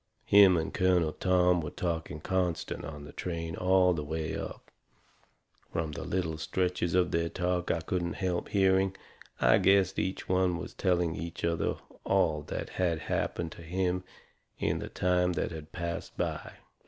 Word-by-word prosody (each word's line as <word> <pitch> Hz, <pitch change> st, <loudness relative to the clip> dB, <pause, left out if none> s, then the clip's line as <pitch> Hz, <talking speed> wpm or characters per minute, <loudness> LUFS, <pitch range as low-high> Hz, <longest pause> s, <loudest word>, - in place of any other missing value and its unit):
Him 100 Hz, -3 st, +7 dB
and 80 Hz, -, -2 dB
Colonel 90 Hz, -4 st, +3 dB
Tom 90 Hz, -1 st, +3 dB
were 75 Hz, -, -4 dB
talking 80 Hz, -3 st, -3 dB
constant 90 Hz, -1 st, -1 dB
on 75 Hz, -2 st, -7 dB
the 75 Hz, -, -10 dB
train 85 Hz, -2 st, -4 dB
all 90 Hz, 0 st, +4 dB
the 75 Hz, -3 st, -3 dB
way 80 Hz, +1 st, -3 dB
up. -, -, -7 dB, 1.0 s
From 80 Hz, -1 st, -2 dB
the 75 Hz, -, -6 dB
little 80 Hz, -4 st, -2 dB
stretches 90 Hz, +1 st, -1 dB
of 90 Hz, -1 st, +3 dB
their 85 Hz, 0 st, +1 dB
talk 90 Hz, +1 st, -1 dB
I 80 Hz, -, +1 dB
couldn't 85 Hz, 0 st, -2 dB
help 90 Hz, -2 st, -2 dB
hearing, 95 Hz, -1 st, +3 dB, 0.4 s
I -, -, +5 dB
guessed 95 Hz, -1 st, +4 dB
each 95 Hz, -, -2 dB
one 90 Hz, -1 st, +2 dB
was -, -, -7 dB
telling 90 Hz, -3 st, +1 dB
the 85 Hz, +1 st, -5 dB, 0.2 s
other 85 Hz, -1 st, 0 dB, 0.3 s
all 90 Hz, -6 st, +2 dB
that -, -, -4 dB
had 85 Hz, -3 st, +1 dB
happened 85 Hz, +2 st, -2 dB
to -, -, -11 dB
him 90 Hz, +2 st, -1 dB, 0.5 s
in -, -, 0 dB
the -, -, -6 dB
time 90 Hz, 0 st, +1 dB
that -, -, -2 dB
had 80 Hz, -1 st, -8 dB
passed 85 Hz, -1 st, -5 dB
by. -, -, -3 dB
90 Hz, 165 wpm, -30 LUFS, 80-95 Hz, 1.0 s, Him